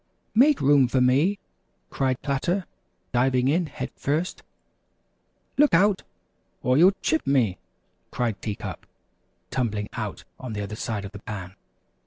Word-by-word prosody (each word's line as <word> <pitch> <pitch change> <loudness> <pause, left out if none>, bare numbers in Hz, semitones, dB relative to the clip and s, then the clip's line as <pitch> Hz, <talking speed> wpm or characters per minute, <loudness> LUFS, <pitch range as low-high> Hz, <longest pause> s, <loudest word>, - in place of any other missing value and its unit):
"Make 275 +6 +5
room 140 -2 +5
for 130 +2 +1
me," 140 +11 +3 0.5
cried 130 -1 -1
Platter, 160 +7 0 0.5
diving 125 +1 +2
in 165 +4 +2
head 145 - -6
first. 155 +6 -2 1.2
"Look 295 - +6
out, 200 +3 +4 0.6
or 125 +1 +3
you'll 180 +7 +6
chip 320 - +1
me," 125 -9 +2 0.5
cried 115 -4 -2
Tea 105 -2 -3
Cup, - - -7 0.6
tumbling 105 -5 -1
out - - -5 0.2
on 125 -3 -6
the 105 - -3
other 100 +1 -5
side 110 -3 -3
of 100 - -7
the 100 - -9
pan. 95 -3 -7
130 Hz, 140 wpm, -25 LUFS, 110-165 Hz, 1.2 s, Look